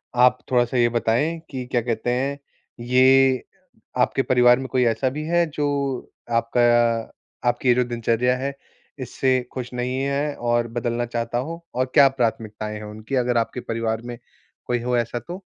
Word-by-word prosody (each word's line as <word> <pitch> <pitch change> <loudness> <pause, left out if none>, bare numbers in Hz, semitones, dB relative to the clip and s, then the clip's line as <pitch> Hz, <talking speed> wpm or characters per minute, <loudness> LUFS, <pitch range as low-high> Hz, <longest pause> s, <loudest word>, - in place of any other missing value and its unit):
आप 125 +1 +5
थोड़ा-सा 125 0 +2
ये 120 0 +4
बताएँ 120 +8 0
कि 130 -2 -5
क्या 120 - +2
कहते 115 0 -2
हैं 140 +3 -1 0.4
ये 130 +1 +4 0.6
आपके 135 - +2
परिवार 125 -1 +4
में 130 - -5
कोई 125 -1 +2
ऐसा 115 +3 +1
भी 150 +4 -5
है 170 0 +3
जो 145 -1 0 0.7
आपका 115 +1 +1 0.9
आपकी 120 +1 0
ये - - +7
जो 125 - +3
दिनचर्या 120 +1 0
है 135 +1 -3 0.5
इससे 130 0 0 0.2
ख़ुश 125 -1 -5
नहीं 125 +1 -2
है 140 +1 -1
और 120 0 0
बदलना 120 +1 -2
चाहता 120 0 -3
हो 165 +6 -4
और 130 +1 +1
क्या 140 -3 +8
प्राथमिकताएँ 110 -4 -3
हैं 105 - -8
उनकी 110 +5 -6
अगर 125 -1 +1
आपके 115 +2 -1
परिवार 115 -1 -2
में 120 0 -7 0.5
कोई 120 -1 -1
हो 125 0 +1
ऐसा 120 +1 -1
तो? 175 - -9
125 Hz, 170 wpm, -23 LUFS, 120-130 Hz, 0.9 s, क्या